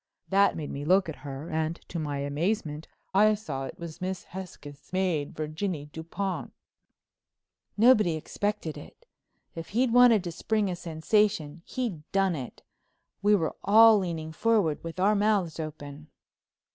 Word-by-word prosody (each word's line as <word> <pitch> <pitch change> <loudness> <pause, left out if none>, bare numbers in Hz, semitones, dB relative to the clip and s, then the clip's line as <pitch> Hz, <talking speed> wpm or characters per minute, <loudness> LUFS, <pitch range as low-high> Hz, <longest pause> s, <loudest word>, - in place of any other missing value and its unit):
That 200 +1 +4
made 150 -3 -5
me 140 - -5
look 185 +3 +3
at 155 - -6
her 140 +3 -7
and, 160 +1 -1
to 170 - -4
my 145 -2 -3
amazement, 150 +2 -2 0.3
I 210 +2 +5
saw 145 -10 -5
it - - -8
was 170 +1 -9
Miss 185 0 -3
Hesketh's 170 -6 -10
maid, 180 -6 -1
Virginie 155 0 -4
Dupont." 180 +4 -4 1.3
Nobody 215 -7 +5
expected 205 +1 -3
it. 80 - -15 0.5
If 165 -1 -7
he'd 235 +2 +1
wanted 245 -5 +6
to 175 - -4
spring 210 +3 -1
a - - -2
sensation 170 -1 0
he'd 230 -12 -3
done 195 -3 +2
it. 130 -4 -8 0.6
We 205 +1 +5
were 165 -5 -1
all 220 +1 +7
leaning 165 -4 -4
forward 200 -4 +1
with 165 +2 -7
our 200 +3 +4
mouths 200 -6 +1
open. 150 -1 -7
175 Hz, 145 wpm, -28 LUFS, 155-205 Hz, 1.3 s, all